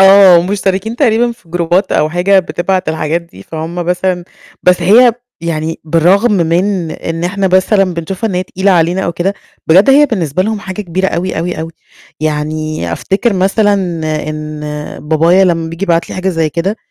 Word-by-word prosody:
آه، 195 -3 +7
مشتركين 195 +3 -2
تقريبًا 240 -2 +2
في 230 -7 -22
جروبات 175 +3 0
أو 155 - +2
حاجة، 180 +4 +2
بتبعت 185 0 -1
الحاجات 160 +1 -1
دي. 170 - -15
فهُم 160 +5 -6
مثلًا 180 +1 -1 0.4
بس 180 -1 +3
هي 230 +7 +6 0.3
يعني 165 -1 -3
بالرغم 180 +8 +3
من 175 0 0
إن 165 +1 -4
إحنا 190 +2 0
مثلًا 190 0 +2
بنشوفها 185 +6 -3
إن 185 - -4
هي 180 - 0
تقيلة 190 +2 -1
علينا 175 +1 +2
أو 170 - -2
كده، 190 +4 -1 0.3
بجد 190 +10 +5
هي 290 +2 +6
بالنسبة 180 - -1
لهم 215 0 -2
حاجة 190 +1 -6
كبيرة 190 +1 -1
أوي، 185 -1 -2
أوي، 170 0 -3
أوي. 165 +1 -5 0.5
يعني 155 - -2
أفتكر 200 - 0
مثلًا 200 +2 +2 0.5
إن 155 0 -6 0.5
بابايا 165 +4 +4
لمّا 165 -3 0
بييجي 170 +4 -4
يبعت 170 -2 0
لي - - -5
حاجة 185 +1 -2
زي 165 -4 0
كده، 180 +7 -2
180 Hz, 170 wpm, -13 LUFS, 165-195 Hz, 0.5 s, آه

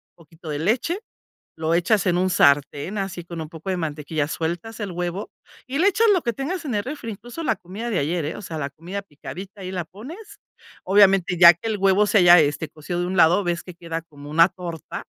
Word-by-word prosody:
poquito 165 0 -13
de 145 - -2
leche, 245 - 0 0.6
lo 160 +1 -1
echas 195 +4 +2
en 175 -1 +2
un 185 - +2
sartén, 145 +4 +2
así 190 -3 -4
con 170 -1 -7
un 155 - -6
poco 165 +3 -7
de 185 - 0
mantequilla, 155 -2 -2
sueltas 175 +8 -4
el 205 - -3
huevo 175 +3 -4 0.4
y 265 +2 -3
le 365 - +3
echas 445 +3 +3
lo 365 - +3
que 235 - -1
tengas 325 - -4
en 250 - -2
el 205 - 0
refri, 255 -4 -6
incluso 240 +10 -8
la 225 - +1
comida 200 +7 -7
de 215 -6 0
ayer, 160 +2 -1
eh, 155 - -4
o - - -9
sea, 160 -4 -6
la 140 -2 -2
comida 175 +7 -6
picadita, 195 +4 -10
ahí 185 - -5
la 180 -3 -3
pones. 325 - -11 0.4
Obviamente, 195 -2 +4
ya 170 -1 +10
que 200 +7 -6
el 215 - -1
huevo 195 +2 +4
se 210 - +3
haya, 175 -1 +8
este, 150 +1 0
cocido 175 +3 -5
de 175 - -1
un 185 - -3
lado, 175 +3 +5
ves 175 -1 -1
que 180 - -10
queda 165 -1 -5
como 145 -3 -13
una 165 +3 +6
torta, 170 -4 -7
180 Hz, 230 wpm, -23 LUFS, 165-210 Hz, 0.6 s, ya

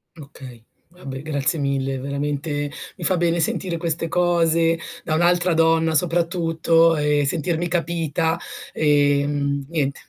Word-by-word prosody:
Okay. 135 -6 -12 0.3
Vabbè 140 -7 -8
grazie 145 0 -1
mille, 135 -1 -1
veramente 145 +1 -3 0.2
mi - - -9
fa 185 - +3
bene 170 0 +1
sentire 175 +2 -1
queste 165 0 -2
cose 165 -1 +2 0.2
da 155 - -1
un'altra 175 +1 +2
donna 165 0 +2
soprattutto 165 -1 +2
e 150 -1 +1
sentirmi 170 +2 -1
capita, 165 -2 -1 0.3
ehm, 145 -1 +1
niente, 145 -4 -2
160 Hz, 120 wpm, -21 LUFS, 145-170 Hz, 0.3 s, fa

